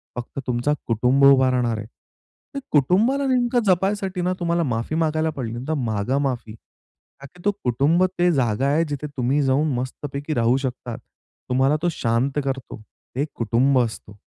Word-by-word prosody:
फक्त 125 +2 -6
तुमचा 125 +4 +1
कुटुंब 125 +4 +2
उभा 135 -1 +6
राहणार 120 -3 0
आहे. 110 0 -6 0.7
ते - - -1
कुटुंबाला 210 - +3
नेमकं 245 -1 +2
जपायसाठी 190 0 +1
ना, 180 +1 0
तुम्हाला 170 0 0
माफी 120 +1 -2
मागायला 160 0 +1
पडली, 125 -7 -5
तर 160 - 0
मागा 120 -2 -1
माफी. 125 -6 -2
का 135 +4 -20
की 180 - -15
तो 205 - +4
कुटुंब 140 +9 +2 0.2
ते 175 0 +4
जागा 130 -2 +1
आहे 150 +4 +2
जिथे 145 +1 -4
तुम्ही 130 +4 +1
जाऊन 135 +3 +2
मस्तपैकी 140 +4 -4
राहू 120 0 +2
शकतात. 125 -3 -4 0.5
तुम्हाला 130 +3 +3
तो 175 - +1
शांत 130 +2 0
करतो. 135 -5 -5 0.3
ते 140 +3 0
कुटुंब 125 +4 +2
असतो. 110 -3 -3
135 Hz, 160 wpm, -22 LUFS, 120-160 Hz, 0.7 s, उभा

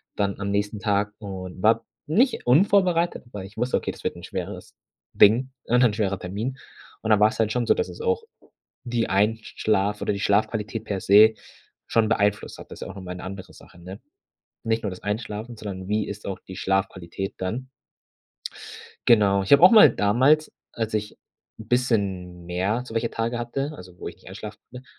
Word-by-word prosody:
dann 100 -1 -1
am 100 0 -2
nächsten 105 +1 -1
Tag 105 +1 0
und 95 -3 -7
war 115 +1 +3 0.2
nicht 240 - +2
unvorbereitet, 175 +4 +3
aber 105 -5 -8
ich 100 +3 -12
wusste, 125 +2 +1
okay, - - -4
das - - -14
wird - - -2
'n - - -11
schweres - - -6 0.4
Ding 120 +6 +5 0.2
und 125 +1 +3
ein 110 -4 +4
schwerer 100 -3 -1
Termin. 105 +9 -4 0.5
Und 110 - -3
dann 105 - +5
war‘s 105 +1 +3
halt 110 -1 +2
schon 120 -1 0
so, - - +6
dass - - -2
es - - -10
auch 465 -1 0 0.6
die 120 -1 -1
Einsch 105 +3 0
schlaf 105 -1 +1
oder - - 0
die 100 - -4
Schlafqualität 110 +1 0
per 100 -2 -3
se 105 +3 +7 0.5
schon 110 -1 +2
beeinflusst 105 -2 0
hat. - - -11
Das - - -10
ist - - -4
ja - - -7
auch - - -14
nochmal 90 -2 -7
'ne 90 - -9
andere 95 0 -8
Sache, 85 - -17
ne? 95 +4 -9 0.7
Nicht 115 0 0
nur 100 - -2
das 90 - -9
Einschlafen, 110 +2 -4
sondern 95 -3 -7
wie 105 0 0
ist 105 +1 -7
auch 95 -2 -4
die 95 - -11
Schlafqualität 95 -1 -2
dann? 115 +8 -4 1.4
Genau. 100 -4 +5
Ich 95 - -5
habe 140 - +8
auch 185 - +10
mal 220 - +9
damals, 130 +9 +3 0.2
als 110 -1 -3
ich 105 0 -3 0.4
'n 110 - -10
bisschen 95 -8 -1
mehr 95 +7 -1
so 115 - -10
welche 115 0 0
Tage 115 +1 -2
hatte, 135 +5 -3
also 90 -5 -13
wo - - -6
ich - - -8
nicht - - -21
einschlafen - - -8
konnte, 125 +1 -10
105 Hz, 195 wpm, -24 LUFS, 100-120 Hz, 1.4 s, auch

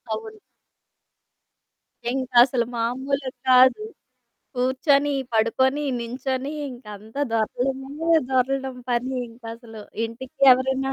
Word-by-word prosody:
అవును. 440 -1 -9 1.7
ఇంకసలు 250 -1 +3
మామూలు 260 +4 -2 0.2
కాదు. 255 +10 +6 0.7
కూర్చొని, 275 +3 +2 0.2
పడుకొని, 260 +6 +2 0.2
నించొని. 260 +3 -3 0.2
ఇంక 250 0 -12
అంతా 220 +7 -8
దొర్లడమే 270 +7 -2 0.2
దొర్లడం 265 0 0
పని 250 +2 -1
ఇంకసలు. 230 -1 -10 0.2
ఇంటికి 230 +3 -9
ఎవరైనా 265 +1 0
260 Hz, 80 wpm, -23 LUFS, 240-270 Hz, 1.7 s, కాదు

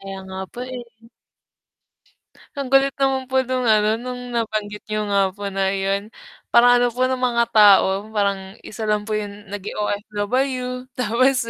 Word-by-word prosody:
Kaya 195 0 -7
nga 190 0 -8
po, 245 - -8
eh. 245 -1 -6 1.7
Ang 280 -2 -4
kulit 270 0 +4
naman 265 -1 +1
po 260 0 +1
nung 255 -1 -2
ano, 215 0 +3
nung 250 0 -7
nabanggit 215 -3 -3
niyo 215 0 -2
nga 195 -1 +2
po 205 -1 -5
na 195 0 0
yun, 195 +2 -2 0.4
parang 245 +1 +7
ano 245 - +3
po 255 +1 +1
no 260 0 -1
mga 240 -2 +2
tao, 205 -2 +5
parang 195 -1 -1
isa 220 0 -6
lang 210 -1 +1
po 215 0 -2
yung 205 -1 -7
naging 205 0 -6
OFW, 250 +5 -2
tapos 250 +2 +2
215 Hz, 160 wpm, -21 LUFS, 205-250 Hz, 1.7 s, parang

